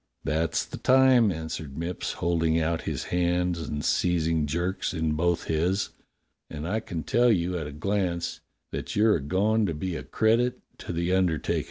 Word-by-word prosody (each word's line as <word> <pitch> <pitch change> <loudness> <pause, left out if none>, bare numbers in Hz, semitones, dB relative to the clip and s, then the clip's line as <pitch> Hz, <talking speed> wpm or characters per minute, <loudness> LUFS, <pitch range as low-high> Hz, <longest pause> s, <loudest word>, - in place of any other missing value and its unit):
"That's 80 +1 0
the - - -8
time," 130 -4 +5
answered 80 -4 -5
Mipps, 85 +2 -3
holding 80 -1 +1
out 80 0 0
his - - -3
hands 90 0 +1
and 75 -1 -4
seizing 80 -3 +1
Jerk's 90 +4 -2
in 80 -1 0
both 85 +2 +1
his. 90 +5 0 0.6
"And 75 +1 -5
I 105 +5 0
can 85 -7 -5
tell 120 +1 +2
A - - +6
YOUNG 90 -3 +1
RECRUIT 90 -3 -2 0.2
171 100 +1 +2
at 95 - +2
a - - -1
glance 85 0 -4 0.3
that - - -5
your 105 -1 +4
a - - -6
goin' 100 +8 +1
to 85 - -2
be 90 +3 -3
a - - -4
credit 115 +3 +1 0.2
to - - -6
the 85 +2 0
under 90 -4 +2
takin'." - - -1
85 Hz, 195 wpm, -27 LUFS, 80-95 Hz, 0.6 s, A